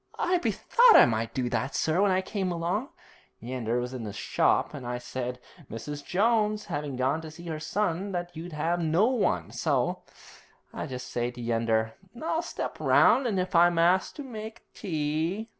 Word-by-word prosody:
'I 360 Hz, 0 st, +1 dB
bethought 475 Hz, +6 st, +4 dB
I -, -, +9 dB
might 115 Hz, -1 st, -1 dB
do 125 Hz, -2 st, -2 dB
that, 125 Hz, +2 st, -2 dB
sir, 160 Hz, +4 st, +1 dB
when 205 Hz, -, +4 dB
I 185 Hz, 0 st, +2 dB
came 190 Hz, -1 st, -3 dB
along. 175 Hz, -, -2 dB, 0.5 s
Yeander 120 Hz, -1 st, -2 dB
was 125 Hz, +1 st, -4 dB
in 125 Hz, -3 st, -5 dB
the 105 Hz, -, -5 dB
shop, 100 Hz, -, +1 dB
and 140 Hz, -3 st, -7 dB
I 125 Hz, 0 st, -2 dB
said, 125 Hz, 0 st, -5 dB, 0.3 s
Mrs. 145 Hz, +6 st, -6 dB
Jones 215 Hz, +1 st, +1 dB
having 145 Hz, -2 st, -4 dB
gone 130 Hz, +5 st, 0 dB
to 160 Hz, -, -8 dB
see 170 Hz, +3 st, -12 dB
her 160 Hz, -2 st, -4 dB
son, 190 Hz, +3 st, -1 dB
that 175 Hz, -1 st, -4 dB
you'd 165 Hz, 0 st, -7 dB
'ave 170 Hz, +3 st, 0 dB
no 165 Hz, +5 st, +3 dB
one, 250 Hz, -2 st, 0 dB
so -, -, 0 dB, 0.7 s
I -, -, -4 dB
just 125 Hz, -2 st, -6 dB
says 120 Hz, 0 st, -2 dB
to 120 Hz, -, -8 dB
Yeander, 115 Hz, -1 st, 0 dB, 0.3 s
"I'll 325 Hz, +1 st, -1 dB
step 340 Hz, -, -5 dB
round, 265 Hz, -1 st, +4 dB
an' 210 Hz, -4 st, -1 dB
if 185 Hz, +1 st, -2 dB
I'm 175 Hz, 0 st, +5 dB
asked 180 Hz, -, +2 dB
I'll 290 Hz, -, -5 dB
make 220 Hz, -3 st, -8 dB
tea."' 165 Hz, +4 st, -2 dB
165 Hz, 185 wpm, -28 LUFS, 125-200 Hz, 0.7 s, I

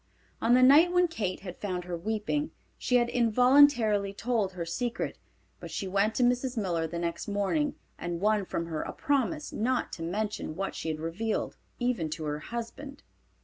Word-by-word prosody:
On 235 Hz, +2 st, +4 dB
the 255 Hz, -, +5 dB
night 300 Hz, +7 st, +7 dB
when 360 Hz, 0 st, +4 dB
Kate 205 Hz, -, -3 dB
had 180 Hz, -2 st, -8 dB
found 185 Hz, -3 st, -2 dB
her 175 Hz, -1 st, -4 dB
weeping 220 Hz, -, -2 dB, 0.3 s
she 250 Hz, -, 0 dB
had 240 Hz, -1 st, +4 dB
involuntarily 240 Hz, -3 st, +4 dB
told 215 Hz, -3 st, -1 dB
her 175 Hz, -2 st, -4 dB
secret, 235 Hz, +8 st, -3 dB, 0.4 s
but -, -, -8 dB
she 195 Hz, -, -4 dB
went 200 Hz, +3 st, +1 dB
to 250 Hz, -, +2 dB
Mrs. 245 Hz, +1 st, +1 dB
Miller 170 Hz, -6 st, 0 dB
the 170 Hz, +2 st, -5 dB
next 170 Hz, 0 st, -3 dB
morning 205 Hz, +9 st, 0 dB, 0.2 s
and 170 Hz, 0 st, -3 dB
won 210 Hz, 0 st, +2 dB
from 170 Hz, -, -3 dB
her 160 Hz, -2 st, -3 dB
a -, -, -5 dB
promise 290 Hz, +1 st, -1 dB
not 250 Hz, +4 st, -1 dB
to -, -, -6 dB
mention 200 Hz, -1 st, -3 dB
what 195 Hz, +2 st, -3 dB
she 160 Hz, -, -4 dB
had 155 Hz, -1 st, -3 dB
revealed, 180 Hz, +8 st, -2 dB, 0.2 s
even 245 Hz, -10 st, -1 dB
to 155 Hz, +1 st, -5 dB
her 150 Hz, 0 st, -2 dB
husband. 240 Hz, -, -7 dB
215 Hz, 185 wpm, -29 LUFS, 180-250 Hz, 0.4 s, night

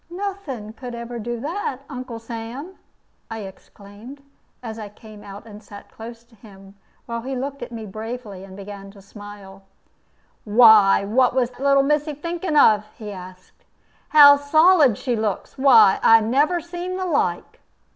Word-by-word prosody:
"Nothing 345 Hz, -, -6 dB
could 245 Hz, 0 st, -9 dB
ever 235 Hz, 0 st, -7 dB
do 240 Hz, +1 st, -5 dB
that, 295 Hz, -3 st, -4 dB
Uncle 255 Hz, -4 st, -8 dB
Sam," 235 Hz, +9 st, -8 dB, 0.5 s
I 225 Hz, -1 st, -6 dB
exclaimed, 205 Hz, +6 st, -13 dB, 0.4 s
as 225 Hz, -1 st, -7 dB
I 210 Hz, -2 st, -8 dB
came 210 Hz, 0 st, -15 dB
and 205 Hz, +1 st, -12 dB
sat 205 Hz, -1 st, -14 dB
close 230 Hz, +1 st, -11 dB
to 235 Hz, 0 st, -29 dB
him, 195 Hz, -2 st, -16 dB, 0.3 s
while 235 Hz, -1 st, -5 dB
he 265 Hz, +3 st, -5 dB
looked 275 Hz, +2 st, -5 dB
at -, -, -7 dB
me 225 Hz, -2 st, -7 dB
bravely, 215 Hz, -1 st, -8 dB
and 190 Hz, 0 st, -12 dB
began 200 Hz, 0 st, -10 dB
to 200 Hz, -, -16 dB
smile. 200 Hz, -1 st, -13 dB, 0.8 s
"Why, 210 Hz, -3 st, +5 dB
what 245 Hz, +5 st, +1 dB
was 250 Hz, -1 st, -1 dB
little 275 Hz, 0 st, +3 dB
missy 300 Hz, +1 st, -1 dB
thinking 335 Hz, +1 st, -3 dB
of?" 215 Hz, -6 st, +4 dB
he 210 Hz, -2 st, -8 dB
asked. 185 Hz, -1 st, -13 dB, 0.5 s
"How 285 Hz, -2 st, +8 dB
solid 300 Hz, -, +4 dB
she 250 Hz, -3 st, -2 dB
looks! 215 Hz, -3 st, -4 dB
Why, 225 Hz, -8 st, +5 dB
I 225 Hz, 0 st, +6 dB
never 280 Hz, +10 st, +1 dB
see 350 Hz, +2 st, -7 dB
the 370 Hz, 0 st, -4 dB
like!" 355 Hz, -, -2 dB
235 Hz, 155 wpm, -21 LUFS, 205-280 Hz, 0.8 s, How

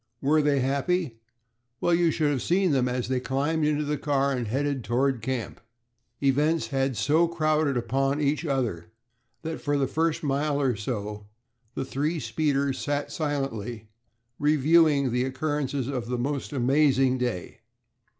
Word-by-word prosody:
Were 150 Hz, +3 st, +3 dB
they 145 Hz, -2 st, +2 dB
happy? 140 Hz, +1 st, 0 dB, 0.6 s
well, 175 Hz, -, +2 dB
you 170 Hz, 0 st, +3 dB
should 155 Hz, -2 st, +1 dB
have 135 Hz, -4 st, -1 dB
seen 185 Hz, 0 st, +2 dB
them 130 Hz, -3 st, +2 dB
as 125 Hz, -1 st, -2 dB
they 130 Hz, 0 st, 0 dB
climbed 145 Hz, +5 st, -1 dB
into 150 Hz, 0 st, +1 dB
the 150 Hz, 0 st, -2 dB
car 140 Hz, -1 st, +1 dB
and 125 Hz, -4 st, -2 dB
headed 135 Hz, +2 st, -1 dB
toward 125 Hz, +3 st, 0 dB
camp. 125 Hz, -1 st, -4 dB, 0.6 s
Events 150 Hz, +4 st, +2 dB
had 135 Hz, -3 st, 0 dB
so 155 Hz, -, +3 dB
crowded 155 Hz, -4 st, +1 dB
upon 135 Hz, +4 st, 0 dB
each 150 Hz, +2 st, 0 dB
other 125 Hz, -, -2 dB, 0.6 s
that 160 Hz, 0 st, -4 dB
for 145 Hz, -2 st, 0 dB
the 140 Hz, -, +2 dB
first 160 Hz, +4 st, -1 dB
mile 145 Hz, +1 st, 0 dB
or 130 Hz, -4 st, +1 dB
so 105 Hz, -1 st, -5 dB, 0.5 s
the 135 Hz, -, -2 dB
three 150 Hz, +5 st, -1 dB
speeders 140 Hz, -3 st, 0 dB
sat 145 Hz, 0 st, -2 dB
silently 120 Hz, -8 st, -3 dB, 0.5 s
reviewing 150 Hz, -2 st, +4 dB
the 125 Hz, +1 st, +1 dB
occurrences 135 Hz, -1 st, -2 dB
of 125 Hz, -4 st, -3 dB
this 125 Hz, 0 st, -2 dB
most 140 Hz, +3 st, -2 dB
amazing 135 Hz, -1 st, +3 dB
day. 120 Hz, -8 st, -3 dB
140 Hz, 150 wpm, -26 LUFS, 130-150 Hz, 0.6 s, reviewing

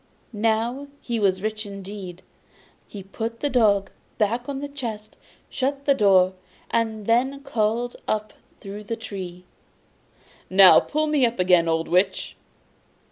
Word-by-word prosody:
Now 225 Hz, +5 st, 0 dB
he 235 Hz, -2 st, -3 dB
was 190 Hz, -2 st, +1 dB
rich 215 Hz, 0 st, -2 dB
indeed. 195 Hz, -3 st, -8 dB, 0.6 s
He 200 Hz, -2 st, -9 dB
put 225 Hz, +4 st, -5 dB
the 290 Hz, -, -1 dB
dog 205 Hz, -5 st, +3 dB, 0.3 s
back 225 Hz, +2 st, +1 dB
upon 275 Hz, 0 st, -4 dB
the 285 Hz, -, -4 dB
chest, 230 Hz, -7 st, -7 dB, 0.3 s
shut 275 Hz, +1 st, -2 dB
the 280 Hz, -, +5 dB
door, 190 Hz, -6 st, +4 dB, 0.4 s
and 220 Hz, -2 st, -1 dB
then 265 Hz, +5 st, +1 dB
called 240 Hz, -2 st, -1 dB
up 215 Hz, 0 st, -2 dB, 0.3 s
through 205 Hz, +1 st, -8 dB
the 230 Hz, -, -3 dB
tree: 185 Hz, -5 st, -8 dB, 1.0 s
'Now 190 Hz, 0 st, +8 dB
pull 310 Hz, +1 st, -1 dB
me 300 Hz, -3 st, +1 dB
up 240 Hz, -1 st, +1 dB
again, 180 Hz, -2 st, +4 dB
old 165 Hz, 0 st, 0 dB
Witch! 185 Hz, +2 st, 0 dB
215 Hz, 135 wpm, -24 LUFS, 195-240 Hz, 1.0 s, Now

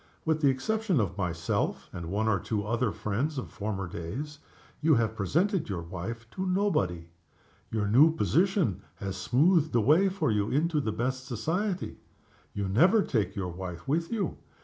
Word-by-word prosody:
With 160 Hz, -1 st, +1 dB
the 140 Hz, -, +5 dB
exception 190 Hz, -, 0 dB
of 95 Hz, -5 st, -1 dB
myself, 85 Hz, -4 st, -1 dB
and 85 Hz, -1 st, -6 dB
one 105 Hz, +4 st, 0 dB
or 105 Hz, -3 st, +2 dB
two 105 Hz, +2 st, -2 dB
other 115 Hz, 0 st, 0 dB
friends 110 Hz, +9 st, -2 dB
of 130 Hz, -, -5 dB
former 100 Hz, -2 st, -3 dB
days, 130 Hz, -, -6 dB, 0.4 s
you 155 Hz, -1 st, +5 dB
have 110 Hz, -2 st, +1 dB
presented 165 Hz, -, 0 dB
your 90 Hz, -4 st, -3 dB
wife 95 Hz, +7 st, -6 dB
to 190 Hz, -, -4 dB
nobody. 180 Hz, -, 0 dB, 0.6 s
Your 105 Hz, -2 st, -1 dB
new 135 Hz, +10 st, +6 dB
position 170 Hz, -, +1 dB
has 95 Hz, -1 st, -5 dB
smoothed 150 Hz, -, +3 dB
the 120 Hz, -, +4 dB
way 160 Hz, -, +5 dB
for 175 Hz, -, 0 dB
you 105 Hz, -1 st, +1 dB
into 155 Hz, +2 st, +1 dB
the 110 Hz, -, -1 dB
best 130 Hz, +4 st, -2 dB
society. 175 Hz, -, -2 dB, 0.5 s
You 100 Hz, -1 st, -3 dB
never 175 Hz, -, +5 dB
take 105 Hz, -5 st, -1 dB
your 95 Hz, -3 st, -2 dB
wife 90 Hz, -1 st, -7 dB
with 165 Hz, +4 st, 0 dB
you. 210 Hz, -7 st, -1 dB
120 Hz, 170 wpm, -29 LUFS, 100-160 Hz, 0.6 s, new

